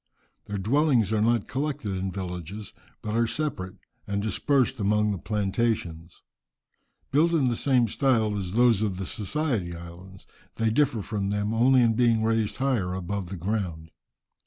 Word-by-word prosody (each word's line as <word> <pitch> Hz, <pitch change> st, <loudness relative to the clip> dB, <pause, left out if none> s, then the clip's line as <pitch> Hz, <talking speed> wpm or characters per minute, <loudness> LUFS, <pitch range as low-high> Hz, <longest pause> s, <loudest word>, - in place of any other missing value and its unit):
Their 105 Hz, -, -4 dB
dwellings 120 Hz, -, +2 dB
are 110 Hz, -, +2 dB
not 115 Hz, -1 st, +2 dB
collected 140 Hz, -5 st, -3 dB
in 95 Hz, 0 st, -2 dB
villages, 95 Hz, +2 st, -6 dB, 0.3 s
but 105 Hz, -, -3 dB
are 115 Hz, 0 st, +2 dB
separate 110 Hz, -10 st, -3 dB, 0.3 s
and 100 Hz, 0 st, -1 dB
dispersed 130 Hz, +4 st, +1 dB
among 105 Hz, +1 st, +2 dB
the 100 Hz, -, -3 dB
plantations. 100 Hz, -5 st, -2 dB, 0.9 s
Built 160 Hz, +5 st, +3 dB
in 140 Hz, -6 st, +3 dB
the 120 Hz, -, 0 dB
same 125 Hz, -2 st, +2 dB
style 115 Hz, -3 st, +1 dB
as 95 Hz, -3 st, -4 dB
those 120 Hz, -2 st, +4 dB
of 100 Hz, -4 st, -1 dB
the 95 Hz, -, -4 dB
Society 110 Hz, -, -2 dB
Isles, 85 Hz, +3 st, -11 dB, 0.3 s
they 115 Hz, -1 st, +1 dB
differ 125 Hz, -4 st, +1 dB
from 100 Hz, -2 st, -2 dB
them 105 Hz, +1 st, -1 dB
only 125 Hz, +3 st, +4 dB
in 115 Hz, -1 st, +3 dB
being 115 Hz, -1 st, +3 dB
raised 110 Hz, -1 st, 0 dB
higher 120 Hz, -10 st, 0 dB
above 95 Hz, 0 st, -4 dB
the 95 Hz, -, -5 dB
ground. 85 Hz, -4 st, -3 dB
105 Hz, 160 wpm, -26 LUFS, 95-120 Hz, 0.9 s, those